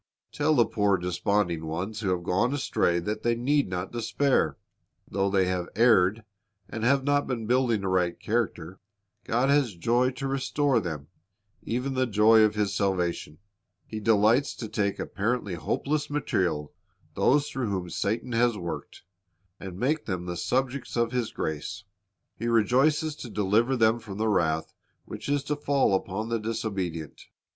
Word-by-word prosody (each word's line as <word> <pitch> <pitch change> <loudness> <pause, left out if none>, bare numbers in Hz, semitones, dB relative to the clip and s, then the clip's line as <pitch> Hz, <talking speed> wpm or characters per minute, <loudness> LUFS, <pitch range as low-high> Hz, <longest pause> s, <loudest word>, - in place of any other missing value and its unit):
Tell 150 +1 +1
the 120 -4 +5
poor 100 -2 +1
desponding 90 -1 0
ones 95 +7 -4
who 105 -3 -1
have 90 -1 -1
gone 95 +10 +1
astray 90 -10 +1
that 105 +5 -3
they 120 0 +1
need 140 +1 +1
not 90 +1 -4
despair. 120 +4 +1 0.5
Though 100 +1 0
they 95 -1 +2
have 90 -1 -2
erred, 110 -2 +4 0.4
and 110 - -6
have 135 +3 +3
not 145 +1 +1
been 120 -4 -3
building 120 -3 +1
a - - -1
right 90 -2 0
character, 95 -6 -2 0.5
God 125 +4 +1
has 140 -8 +2
joy 120 +8 +2
to 135 +2 -4
restore 135 0 +1
to - - +2
them, 80 -5 -6 0.5
even 125 +4 -2
the 130 0 +1
joy 110 +1 +5
of 105 -1 +3
His 105 -2 0
salvation. 90 -6 -1 0.5
He 110 - -6
delights 110 +5 +3
to 115 - -6
take 100 -2 -1
apparently 105 -1 -2
hopeless 145 - -2
material, 90 - -1 0.4
those 145 +1 +3
through 130 -7 -2
whom 90 -3 -3
Satan 110 +8 -2
has 120 -1 +2
worked, 85 -3 -6 0.6
and 95 -2 -8
make 145 +8 0
them 90 -4 -3
the 90 0 -4
subjects 130 +7 -2
of 120 0 +1
His 125 -3 -1
grace. 80 +6 -4 0.5
He 115 - -4
rejoices 135 +7 +2
to 120 - -8
deliver 110 +5 +1
them 115 0 +3
from 105 -4 -9
the 110 +1 0
wrath 80 -5 0 0.3
which - - -7
is 145 -1 +1
to 150 +1 -2
fall 140 -6 +1
upon 95 +3 -2
the 115 0 0
disobedient. 100 -8 -4
110 Hz, 165 wpm, -27 LUFS, 95-125 Hz, 0.6 s, the